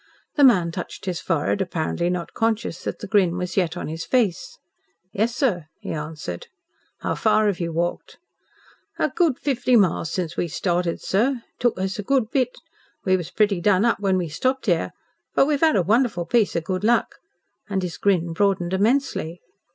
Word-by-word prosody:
The 290 - +3
man 185 -10 +5
touched 180 +2 -7
his 180 -3 -2
forehead, 165 +3 0
apparently 175 -1 -1
not 180 -1 -3
conscious 225 -6 -1
that - - -3
the - - -7
grin 190 -4 +2
was 180 -1 -4
yet 175 -3 0
on - - -4
his 160 +2 -5
face. 245 - 0 0.6
"Yes, 230 +4 0
sir," 190 - 0
he - - -6
answered. 155 - -5 0.5
"How - - -1
far 215 -1 +2
have 200 -4 0
you 170 -1 -2
walked?" 170 +2 -3 0.8
"A - - +1
good 325 -8 +1
fifty 255 -3 +1
miles 185 -6 +3
since 175 -2 -3
we 175 - -1
started, 175 +1 -1
sir. 235 +5 +1
It - - -50
took 240 -6 +1
us 190 +2 -2
a - - 0
good 235 +1 +1
bit. 255 -3 +1 0.5
We 185 -1 +4
was 175 -3 -3
pretty 205 -4 +1
done 200 +2 +3
up 235 - +2
when 195 -2 +1
we 180 -2 -1
stopped 260 - -1
here. 175 -6 +1 0.5
But - - +5
we've 290 -1 0
'ad 320 -1 +4
a 190 - +3
wonderful 215 -3 +1
piece 215 +4 +2
of 170 - 0
good 185 +2 -3
luck." 235 +2 +1 0.5
And 190 -2 -1
his 175 -2 -4
grin 175 -4 +1
broadened 190 -1 +1
immensely. 205 - 0
190 Hz, 190 wpm, -23 LUFS, 175-230 Hz, 0.8 s, man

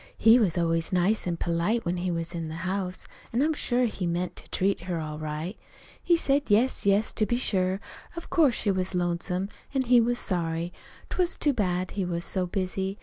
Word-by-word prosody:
He 225 +2 +6
was 185 -7 +1
always 165 -1 +1
nice 185 +3 +2
an' 170 -1 -1
polite, 175 +8 0
when 175 +1 -1
he 180 +1 -2
was 165 0 -3
in 165 -2 -4
the 160 - -6
house, 185 -1 -3 0.3
an' 240 +4 +2
I'm 315 +1 +2
sure 250 -4 +1
he 200 -6 -2
meant 175 +1 -2
to - - -11
treat 195 +2 0
her 170 -2 -1
all 155 -1 -5
right. 155 +5 -4 0.5
He 345 -1 +3
said 285 -3 +2
yes, 220 +1 +3
yes, 200 +2 +3
to 215 - +1
be 240 - +1
sure, 190 -5 +1 0.4
of 335 - -8
course 295 -8 +4
she 205 - +1
was 185 -1 -1
lonesome, 180 +2 -1 0.3
an' 265 - +2
he 245 -1 +5
was 240 +1 +1
sorry. 170 -3 -1 0.4
'T - - -4
was 355 -1 +2
too 290 - +2
bad 185 -5 -1
he 200 - -2
was 170 -1 -3
so 185 -2 -1
busy. 190 +1 -2
185 Hz, 210 wpm, -27 LUFS, 175-225 Hz, 0.5 s, He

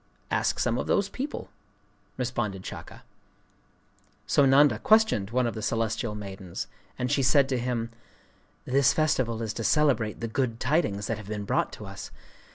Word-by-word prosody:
'Ask - - +1
some 120 0 +1
of - - -3
those 200 -1 +2
people,' 280 +3 -5 0.7
responded 120 -7 -2
Shaka. - - -8 1.2
So 140 - +4
Nanda 140 +2 +5
questioned 215 - +3
one 125 +2 +1
of 115 - -1
the 110 - -5
celestial 115 +1 -1
maidens; 95 -4 -6 0.3
and 125 0 -1
she 140 - +2
said 135 +1 +4
to 130 -2 0
him:—'This 125 +3 -2
festival 130 -7 +1
is 110 -1 -3
to 115 - -4
celebrate 125 -7 +2
the 115 - -3
good 115 0 -1
tidings 105 -11 +1
that 115 -1 -2
have 105 - -10
been 105 -1 -4
brought - - 0
to - - -8
us. - - -8
120 Hz, 160 wpm, -27 LUFS, 110-140 Hz, 1.2 s, Nanda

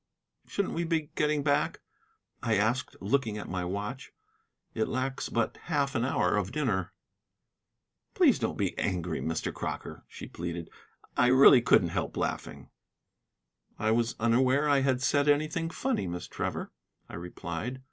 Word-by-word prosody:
"Shouldn't 200 - -2
we 170 - -1
be 160 -3 -1
getting 150 -1 +1
back?" 145 -1 +1 0.6
I 115 -2 +1
asked, 110 +6 0
looking 110 +1 0
at 105 - -6
my 90 -1 -3
watch. 105 +8 -4 0.6
"It 110 - 0
lacks 130 +1 -2
but 115 -2 -1
half 145 -4 0
an 115 - 0
hour 130 -4 +1
of 100 -1 -1
dinner." 115 - -1 1.2
"Please - - +5
don't - - -2
be - - -1
angry, 90 -2 -1
Mr. 80 0 -2
Crocker," - - -5
she - - -9
pleaded. 85 -1 -6 0.4
"I - - +4
really 130 0 +8
couldn't - - +4
help - - -3
laughing." - - -4 1.1
"I 110 +1 +1
was 115 +1 +1
unaware 130 +5 +3
I 140 -1 +4
had 130 -1 +1
said 145 +1 +3
anything 155 +3 +1
funny, 250 - -1
Miss 90 0 -4
Trevor," - - -4 0.4
I - - -13
replied. 90 +7 -5
125 Hz, 145 wpm, -29 LUFS, 100-145 Hz, 1.2 s, really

